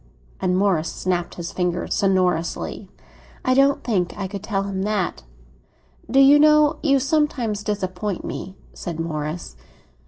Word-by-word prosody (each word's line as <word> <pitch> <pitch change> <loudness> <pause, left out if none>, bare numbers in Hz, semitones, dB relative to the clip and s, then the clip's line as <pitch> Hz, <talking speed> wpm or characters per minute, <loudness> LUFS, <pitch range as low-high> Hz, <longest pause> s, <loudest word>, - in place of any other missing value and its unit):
And 185 -1 +1
Morris 185 -5 +1
snapped 175 -2 -2
his 175 +1 -6
fingers 180 -1 -1
sonorously. 185 -4 0 0.6
"I 255 - +3
don't 275 +1 +3
think 195 -7 -1
I 195 -1 -3
could 200 0 -6
tell 200 -2 -1
him 195 -1 -3
that." 195 - -1 0.9
"Do 270 - +4
you 280 +2 +7
know 300 0 +5
you 275 -3 +3
sometimes 265 -7 0
disappoint 195 -2 -3
me?" 190 - -6 0.2
said 170 -2 -6
Morris. 155 - -4
195 Hz, 135 wpm, -22 LUFS, 180-255 Hz, 0.9 s, you